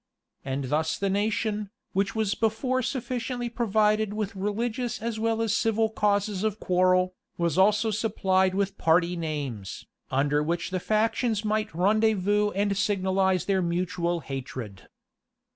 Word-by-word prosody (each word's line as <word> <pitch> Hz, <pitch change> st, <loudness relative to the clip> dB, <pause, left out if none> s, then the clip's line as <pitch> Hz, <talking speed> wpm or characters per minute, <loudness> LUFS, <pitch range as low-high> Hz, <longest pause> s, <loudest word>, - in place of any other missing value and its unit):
And 135 Hz, +1 st, -3 dB
thus 155 Hz, +2 st, 0 dB
the 195 Hz, -1 st, 0 dB
nation, 210 Hz, 0 st, -1 dB, 0.2 s
which 195 Hz, +3 st, 0 dB
was 215 Hz, -2 st, +1 dB
before 240 Hz, +4 st, 0 dB
sufficiently 245 Hz, -1 st, -3 dB
provided 215 Hz, -2 st, +1 dB
with 215 Hz, -1 st, -3 dB
religious 225 Hz, +5 st, -2 dB
as 225 Hz, 0 st, -3 dB
well 225 Hz, 0 st, +1 dB
as 220 Hz, -1 st, +1 dB
civil 225 Hz, 0 st, +2 dB
causes 205 Hz, -2 st, 0 dB
of 215 Hz, -1 st, -1 dB
quarrel, 185 Hz, 0 st, +2 dB, 0.2 s
was 170 Hz, -2 st, 0 dB
also 210 Hz, +4 st, +3 dB
supplied 190 Hz, -3 st, +1 dB
with 200 Hz, 0 st, -1 dB
party 170 Hz, +2 st, +3 dB
names, 145 Hz, -, -4 dB, 0.2 s
under 145 Hz, +2 st, +1 dB
which 170 Hz, +4 st, -2 dB
the 185 Hz, -, -1 dB
factions 220 Hz, +2 st, 0 dB
might 215 Hz, 0 st, 0 dB
rendezvous 210 Hz, +1 st, +2 dB
and 200 Hz, 0 st, +1 dB
signalize 190 Hz, -2 st, +1 dB
their 195 Hz, -1 st, +1 dB
mutual 175 Hz, 0 st, -1 dB
hatred. 125 Hz, -8 st, -7 dB
200 Hz, 135 wpm, -27 LUFS, 180-220 Hz, 0.2 s, also